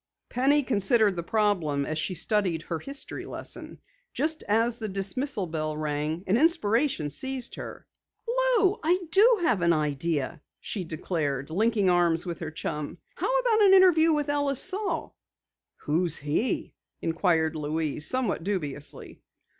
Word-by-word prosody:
Penny 280 +4 +2
considered 215 -3 +2
the 170 - -2
problem 170 -8 0
as 155 - -3
she 170 +4 -2
studied 180 -3 0
her 165 - -4
history 275 - -6
lesson. - - -6 0.4
Just 315 0 -1
as 230 +3 +1
the 220 -2 -4
dismissal 200 +4 0
bell 155 -2 -3
rang 155 +2 -2
an 195 +4 +2
inspiration 265 - +2
seized 265 - -2
her. - - -8 0.4
"Lou, 475 -4 +2
I 345 +3 +3
do 450 +4 +6
have 235 - +2
an 170 -1 +3
idea!" 150 0 -2 0.2
she 195 - -4
declared, 155 -4 -3
linking 210 +2 +1
arms 175 -1 +3
with 170 -2 -5
her 160 - -5
chum. 150 -2 -5 0.2
"How - - 0
about 455 -3 +2
an 390 -2 +7
interview 340 -4 +5
with 300 -2 0
Ellis 285 -2 0
Saal?" 375 -3 -2 0.7
"Who 165 +4 0
is 165 -2 +1
he?" 150 - -2 0.3
inquired 165 -1 +1
Louise, 150 0 -1
somewhat 255 -9 +1
dubiously. 150 -7 -4
195 Hz, 145 wpm, -27 LUFS, -, 0.7 s, an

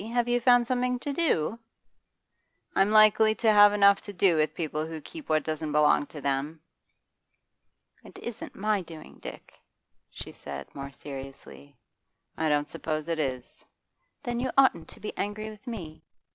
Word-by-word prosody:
Have 235 +3 -1
you 240 0 +1
found 245 0 +5
something 250 0 0
to 280 +3 -4
do?' 230 - 0 1.2
'I'm 195 +1 +4
likely 215 0 +5
to 220 -1 +3
have 205 0 +8
enough 200 -1 +5
to 205 - -8
do 185 -2 +3
with 155 0 +1
people 155 -1 -3
who 160 -1 -6
keep 310 - -11
what 155 -1 +2
doesn't 155 -1 -3
belong 150 -1 +3
to 150 - -10
them.' 140 +3 -2 1.4
'It - - -14
isn't 235 -2 -7
my 210 0 0
doing, 165 -3 -12
Dick,' - - -11 0.5
she - - -9
said 70 0 -9
more 140 0 -7
seriously. 135 0 -10 0.6
'I 160 0 0
don't 145 0 +1
suppose 155 -1 -3
it 165 -1 -1
is.' 130 -4 -4 0.6
'Then 240 -1 -2
you 255 +1 -1
oughtn't 270 -1 +4
to - - -14
be 210 - -6
angry 215 +2 -4
with 215 +3 -16
me. 170 -10 -7
190 Hz, 160 wpm, -27 LUFS, 150-220 Hz, 1.4 s, have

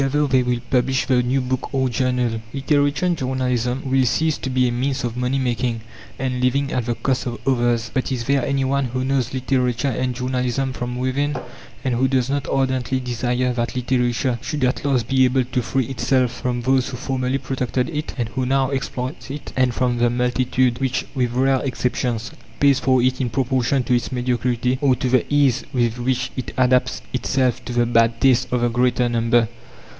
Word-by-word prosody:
Together 145 +2 +2
they 130 -2 +3
will 125 -1 -1
publish 130 +1 +2
the 125 -2 +3
new 125 +2 +1
book 130 0 -3
or 130 -1 +2
journal. 125 -2 0
Literature 145 +3 +1
and 175 -1 +2
journalism 125 -2 -1
will 135 0 +2
cease 155 +6 +1
to 130 - -4
be 130 -1 +2
a - - 0
means 130 +2 -1
of 120 -1 -3
money 125 +2 0
making 120 -2 -1 0.4
and 125 -1 -2
living 140 +2 +1
at 125 -2 -1
the 120 - 0
cost 125 +2 -1
of 120 -1 -4
others. 120 -3 +1
But 130 - -1
is 125 -3 -2
there 140 +1 +1
any 135 0 0
one 140 +1 +1
who 130 +1 -2
knows 135 -2 0
literature 130 0 0
and 125 +1 -2
journalism 125 +1 -1
from 125 0 -4
within, 140 +3 -1 0.5
and 130 -2 0
who 130 +3 +2
does 130 -1 +1
not 140 -1 -1
ardently 130 -1 0
desire 125 0 -1
that 120 0 -2
literature 125 -1 0
should 145 0 -3
at 125 0 0
last 135 -4 +1
be 135 -1 +3
able 130 +1 +2
to 125 +1 -2
free 130 +2 -1
itself 130 -1 +1
from 125 0 -3
those 130 +1 +2
who 125 - -6
formerly 130 0 -1
protected 130 -1 -2
it, 150 0 -4
and 120 -3 -2
who 130 +3 -2
now 135 +1 +1
exploit 130 0 -4
it, 145 +2 -7
and 130 -2 +2
from 125 -2 0
the 120 0 +3
multitude, 125 0 +1
which, 130 -1 -1
with 125 -4 0
rare 130 +1 +2
exceptions, 125 -3 -2 0.3
pays 140 -1 +4
for 130 -2 +2
it 130 +1 +1
in 125 - 0
proportion 130 0 +1
to 125 - 0
its 120 - -1
mediocrity, 125 0 0
or 135 -3 +4
to 125 +1 -2
the 130 +3 +1
ease 140 -3 +3
with 120 -3 0
which 130 +1 -1
it 130 - -5
adapts 125 - +2
itself 130 -3 0
to - - -5
the 120 0 +2
bad 115 -1 +2
taste 130 -2 +3
of 125 -1 +1
the 120 - +3
greater 125 +1 +1
number? 115 0 +2
125 Hz, 200 wpm, -21 LUFS, 120-135 Hz, 0.5 s, pays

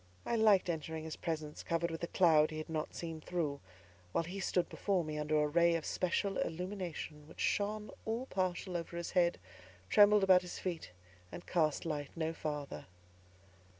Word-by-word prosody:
I 235 - 0
liked 215 -5 +5
entering 160 -1 -3
his 160 -1 -5
presence 155 -2 -4
covered 170 0 -1
with 165 - -5
a 170 - -2
cloud 160 -4 +5
he 155 - -6
had 155 +1 -6
not 155 -1 -3
seen 165 -2 -5
through, 155 -5 -2 0.5
while - - +2
he 180 +4 -6
stood 180 -2 +1
before 195 -4 0
me 155 -1 -4
under 150 0 +1
a - - +2
ray 170 +2 +4
of 165 - -2
special 190 +2 0
illumination 170 -4 -4
which - - -15
shone 210 0 0
all 230 +3 -2
partial 185 -4 -2
over 170 0 -4
his 170 - -4
head, 175 -2 +3 0.5
trembled 205 -1 +7
about 185 -1 +7
his 180 - -7
feet, 175 -3 -4 0.4
and 175 - -8
cast 155 -4 +1
light 145 -3 -2
no 165 -1 -1
farther. 150 -3 -5
170 Hz, 180 wpm, -34 LUFS, 155-185 Hz, 0.5 s, trembled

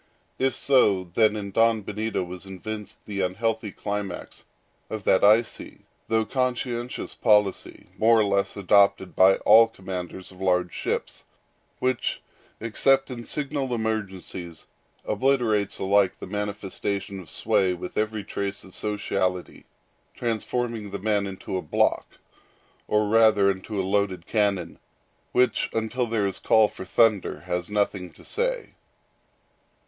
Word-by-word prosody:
If 135 0 +1
so, 105 -9 +3
then 110 0 +4
here 110 0 0
was 90 +2 -8
evinced 105 +2 -7
the 100 -2 -3
unhealthy 110 +3 -1
climax 100 -3 -5 0.4
of 110 -2 -5
that 95 - +3
icy 110 +3 +2 0.2
though 110 0 +1
conscientious 125 -1 -2
policy, 105 -4 +1
more 115 +1 +5
or - - +4
less 100 -1 0
adopted 100 -1 +3
by 95 +1 +6
all 115 +2 +6
commanders 95 -3 -7
of 95 0 -15
large 90 -2 +1
ships, - - -3 0.5
which, 130 -2 -1 0.4
except 135 +4 +2
in 120 -2 -7
signal 140 -3 -2
emergencies, 95 -7 -4 0.4
obliterates 110 -3 +1
alike 100 0 +2
the - - -8
manifestation 100 0 -4
of 90 -6 -11
sway 95 -2 +1
with 90 +1 -8
every 110 -1 -1
trace 100 +1 -4
of 95 - -15
sociality; 95 -3 -2 0.5
transforming 115 -1 -2
the 100 - -4
man 100 0 0
into 95 -1 -5
a - - -2
block, 75 - 0 0.7
or 105 0 +2
rather 110 -2 +5
into 95 +2 -5
a 95 - 0
loaded 95 -3 0
cannon, 100 -6 0 0.5
which, 125 0 +2
until 115 +2 -1
there 110 -3 0
is 95 -1 -3
call 110 -1 +4
for 95 - -9
thunder, 110 0 +2
has 90 0 -3
nothing 100 -3 -1
to - - -18
say. - - -2
105 Hz, 130 wpm, -25 LUFS, 95-115 Hz, 0.7 s, by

